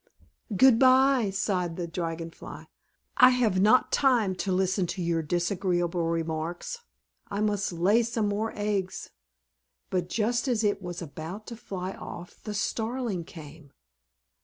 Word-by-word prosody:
"Good 260 -1 +6
bye," 260 -3 +5
sighed 190 -3 -1
the 175 - -3
Dragon 165 -1 -4
Fly. - - -10 0.5
"I 255 - +9
have 235 -7 +2
not 220 +5 +4
time 240 -8 +3
to 195 - -2
listen 185 0 +1
to 185 - -5
your 170 -1 0
disagreeable 175 +1 0
remarks. 165 - -3 0.5
I 200 - -4
must 205 -2 0
lay 185 +7 +3
some 230 -2 -1
more 210 +2 -1
eggs." 205 -3 -2 0.8
But 180 -1 -1
just 235 +6 0
as 235 -3 +1
it 205 -1 +1
was 175 -1 -6
about 165 +7 -7
to 235 - -7
fly 190 -4 -5
off 175 +1 -10
the 210 -1 -5
Starling 220 -3 -2
came. 155 -3 -12
190 Hz, 140 wpm, -27 LUFS, 175-220 Hz, 0.8 s, I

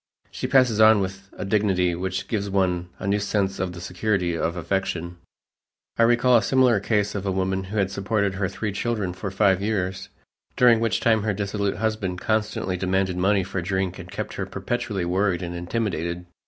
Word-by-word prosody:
She - - -4
passes 125 -5 +4
on 110 -1 +7
with 95 0 -4
a - - -4
dignity 95 -3 +2
which 95 +2 -3
gives 100 -3 -2
one 90 -2 0
a - - -7
new 100 +1 +1
sense 100 -1 -1
of 95 -1 -2
the 85 - -8
security 90 -1 -1
of 85 +1 -1
affection. 85 0 -2 0.8
I - - 0
recall 120 +1 +5
a - - +3
similar 125 -3 +3
case 105 0 0
of 100 - -3
a - - +1
woman 95 0 -1
who 105 +4 -5
had 95 -2 +1
supported 100 0 0
her 95 -1 -1
three 105 +2 -3
children 100 -3 -2
for 100 +3 -5
five 95 -1 +2
years, 95 -3 -2 0.5
during 120 -2 +6
which 115 -1 0
time 110 -2 +3
her 105 -1 -1
dissolute 100 0 -1
husband 105 -5 -2
constantly 105 -3 -1
demanded 95 0 0
money 95 +1 +2
for 90 0 -3
drink 95 0 -2
and - - -9
kept - - -5
her - - -4
perpetually 105 -6 -3
worried 90 0 0
and 85 0 -4
intimidated. 85 -2 -3
95 Hz, 190 wpm, -24 LUFS, 90-105 Hz, 0.8 s, on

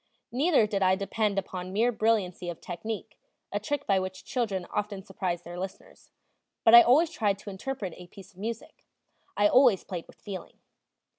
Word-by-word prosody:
Neither 275 -1 +3
did 205 -2 -2
I 185 0 +4
depend 200 +1 -1
upon 185 -1 -4
mere 225 +5 +2
brilliancy 210 -6 0
of 170 - -6
technique, 205 +5 -6 0.3
a 205 - -1
trick 285 +7 -3
by 195 -2 +3
which 185 0 -6
children 205 -8 -2
often 205 -2 -3
surprise 180 -2 -3
their 175 +1 -8
listeners; 190 +1 -8 0.5
but 225 - +6
I 235 - +12
always 305 +8 +4
tried 205 -9 0
to 200 +1 -8
interpret 195 -2 -5
a 180 - -12
piece 190 +2 -14
of 185 - -19
music; 225 +2 -6 0.5
I 205 - +5
always 245 -4 +5
played 175 -4 -6
with - - -18
feeling. 195 -4 -8
200 Hz, 175 wpm, -28 LUFS, 185-225 Hz, 0.5 s, I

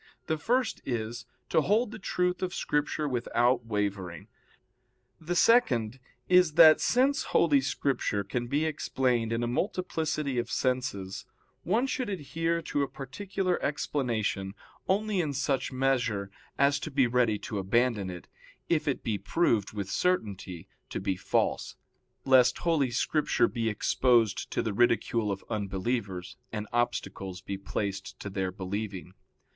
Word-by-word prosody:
The 160 -1 -1
first 240 - 0
is, 120 0 -4 0.2
to - - +3
hold 210 - +2
the 220 - -8
truth 180 -1 -1
of 185 0 -2
Scripture 150 +1 -1
without 120 -1 +1
wavering. 100 -5 -3 0.9
The 170 +2 -3
second 130 - +3 0.3
is 180 -3 +5
that 160 -1 +8
since 270 +3 +2
Holy 145 -5 +4
Scripture 130 -6 -1
can 120 +5 -3
be 145 +5 +1
explained 125 -6 0
in 115 +1 0
a - - 0
multiplicity 155 - -1
of 120 0 -3
senses, 125 -7 -2 0.3
one 220 +9 +1
should 255 -3 -2
adhere 165 -1 -2
to 145 -2 -1
a 140 - +1
particular 180 +8 -3
explanation, 115 -9 -1 0.3
only 205 0 +1
in 150 -4 -2
such 135 0 -1
measure 125 -7 0 0.3
as 140 +1 +3
to - - -5
be 135 -3 +3
ready 120 -3 +2
to 105 0 -5
abandon 105 0 +1
it, 90 -1 -8 0.4
if 160 -3 +1
it 140 - -1
be 105 -3 -1
proved 105 - +1
with 100 -2 -5
certainty 100 - -1 0.2
to - - -3
be 95 - -1
false; 95 - -1 0.5
lest 130 -2 +5
Holy 160 -6 +1
Scripture 150 +5 +1
be 115 -2 -1
exposed 115 0 +2
to - - -1
the 110 - -2
ridicule 115 -1 +2
of 95 - -5
unbelievers, 100 0 -3
and 105 -1 -4
obstacles 100 -6 -2
be 100 - -4
placed 100 0 -4
to 100 - -6
their 95 -1 -2
believing. 95 -1 -5
125 Hz, 140 wpm, -29 LUFS, 105-155 Hz, 0.9 s, that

